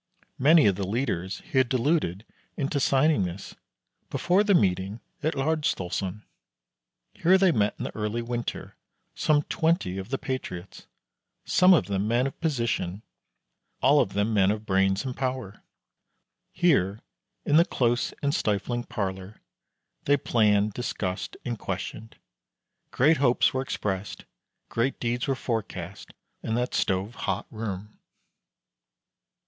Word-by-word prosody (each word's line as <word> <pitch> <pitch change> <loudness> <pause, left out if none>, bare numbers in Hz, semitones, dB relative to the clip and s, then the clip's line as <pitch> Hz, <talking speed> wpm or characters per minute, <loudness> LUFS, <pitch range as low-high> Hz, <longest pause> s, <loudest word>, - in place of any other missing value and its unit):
Many 150 +3 +6
of 95 -3 +3
the 100 -2 -2
leaders 100 -5 -2
he 130 - 0
had 130 -2 +2
deluded 125 - 0 0.3
into 140 0 -1
signing 140 0 +3
this 90 +2 -6 0.6
before 185 +4 +2
the 205 -2 +3
meeting 95 - +1 0.2
at 155 +1 0
Laersdalsoren. 110 - -1 0.9
Here 185 +3 +4
they 190 -2 +4
met 105 -8 +1
in - - -5
the - - -5
early 110 +2 -2
winter, 120 0 -4 0.4
some 150 -1 +2
twenty 160 - 0
of 95 - -7
the 135 - -1
patriots, 115 -10 -6 0.6
some 185 +1 +5
of 150 - +2
them 100 +1 -1
men 120 +3 +2
of 135 - -5
position, 115 - -1 0.8
all 145 +3 +5
of 95 - +1
them 105 +2 0
men 95 -2 +4
of 105 +1 -2
brains 95 +2 +2
and 130 -2 -4
power. 130 -6 -4 0.9
Here, 110 - +2 0.4
in 145 - +4
the 165 - +7
close 120 -5 0
and 140 0 +1
stifling 120 +3 -1
parlor, 95 -3 -4 0.7
they 145 0 +4
planned, 105 -4 +2
discussed, 95 -6 -4
and 120 -3 -3
questioned. 110 +1 -5 0.7
Great 155 +5 +3
hopes 125 -3 +3
were 130 - 0
expressed, 100 -6 -4 0.4
great 120 +4 -1
deeds 120 0 -1
were 135 - +1
forecast, 100 -7 -4 0.3
in 110 - -2
that 125 +1 -1
stove 95 +4 0
hot 100 -3 -3
room. 105 -2 -6
115 Hz, 135 wpm, -26 LUFS, 100-135 Hz, 0.9 s, the